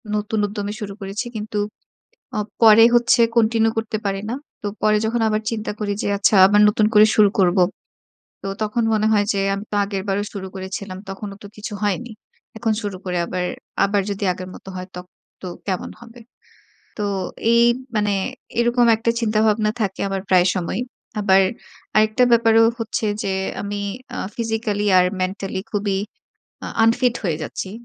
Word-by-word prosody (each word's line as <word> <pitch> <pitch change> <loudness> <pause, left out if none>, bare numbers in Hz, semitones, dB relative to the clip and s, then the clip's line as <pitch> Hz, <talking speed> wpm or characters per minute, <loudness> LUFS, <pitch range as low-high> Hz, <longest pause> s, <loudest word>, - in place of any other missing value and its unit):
নতুন 210 +1 -1
উদ্যমে 205 0 -4
শুরু 205 -3 -5
করেছি। 195 +4 -4
কিন্তু 210 0 -3 0.8
আ - - +1 0.2
পরে 225 0 +8
হচ্ছে 240 0 +4 0.2
continue 225 0 +3
করতে 220 -1 -2
পারি 195 0 -1
না। 240 - -2 0.3
তো 205 - -3 0.2
পরে 215 0 +4
যখন 230 +1 0
আবার 215 0 0
চিন্তা 220 -1 -3
করি 205 -1 -1
যে - - -2
আচ্ছা, 205 +1 +3
আবার 205 +2 +5
নতুন 210 0 +2
করে 210 0 +8
শুরু 210 -2 +6
করবো। 185 0 +4 0.8
তো - - -4 0.2
তখন 215 +2 -1
মনে 215 0 +2
হয় 205 -1 +3
যে 200 - -1
আমি 200 +1 -4
তো - - -2
আগেরবারও 200 0 -2
শুরু 195 -2 -5
করেছিলাম, 190 0 -6
তখনও 195 +1 -6
তো - - -8
কিছু 210 0 -6
হয়নি। 215 +4 -1 0.5
এখন 225 -1 0
শুরু 205 -3 -4
করে 180 -1 -2
আবার, 180 +1 -3 0.4
আবার 200 0 +1
যদি 200 0 -3
আগের 185 +1 -8
মত - - -14
হয়, 185 0 -6
তখন 180 0 -10 0.3
তো 185 - -6 0.2
কেমন 185 -2 -2
হবে? 240 0 -13 0.8
তো 210 - -1 0.5
এই 235 0 +5 0.3
মানে 210 -1 +1 0.5
এরকম 240 0 +3
একটা 225 +1 0
চিন্তাভাবনা 215 -1 +2
থাকে 195 -2 -2
আমার 195 -1 -3
প্রায় 180 -1 +5
সময়ই। 185 +5 -2 0.4
আবার 195 -2 +5 0.6
আরেকটা 215 +3 +3
ব্যাপারও 225 -1 +5
হচ্ছে 225 -1 -2 0.2
যে, 195 - -1 0.3
আমি 205 0 -4 0.4
আ - - -4 0.2
physically 225 -3 -2
আর 180 - +4 0.2
mentally 190 0 -3
খুবই 200 -2 0 0.7
আ - - -4 0.2
unfit 240 +2 +3
হয়ে 165 -5 0
যাচ্ছি 190 +4 -5
210 Hz, 165 wpm, -21 LUFS, 195-220 Hz, 0.8 s, পরে